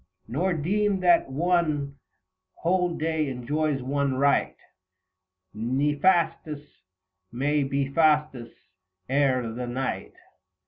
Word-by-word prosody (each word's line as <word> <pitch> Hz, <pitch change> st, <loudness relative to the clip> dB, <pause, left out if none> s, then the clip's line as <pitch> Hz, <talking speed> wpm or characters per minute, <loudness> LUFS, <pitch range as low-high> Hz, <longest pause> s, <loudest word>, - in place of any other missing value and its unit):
Nor 175 Hz, +9 st, 0 dB
deem 195 Hz, +5 st, 0 dB
that 175 Hz, -5 st, +4 dB
one 150 Hz, -2 st, 0 dB, 0.6 s
whole 180 Hz, 0 st, 0 dB
day 160 Hz, -2 st, -1 dB
enjoys 135 Hz, +2 st, -2 dB
one 140 Hz, 0 st, 0 dB
right, 140 Hz, +2 st, +2 dB, 1.0 s
ISTefastus 150 Hz, -, 0 dB, 0.7 s
may 145 Hz, +5 st, 0 dB
be 135 Hz, 0 st, -1 dB
Fastus 150 Hz, -5 st, +1 dB, 0.6 s
ere 130 Hz, -4 st, +1 dB
the 125 Hz, +2 st, -5 dB
night. 125 Hz, -, -4 dB
145 Hz, 90 wpm, -26 LUFS, 135-165 Hz, 1.0 s, that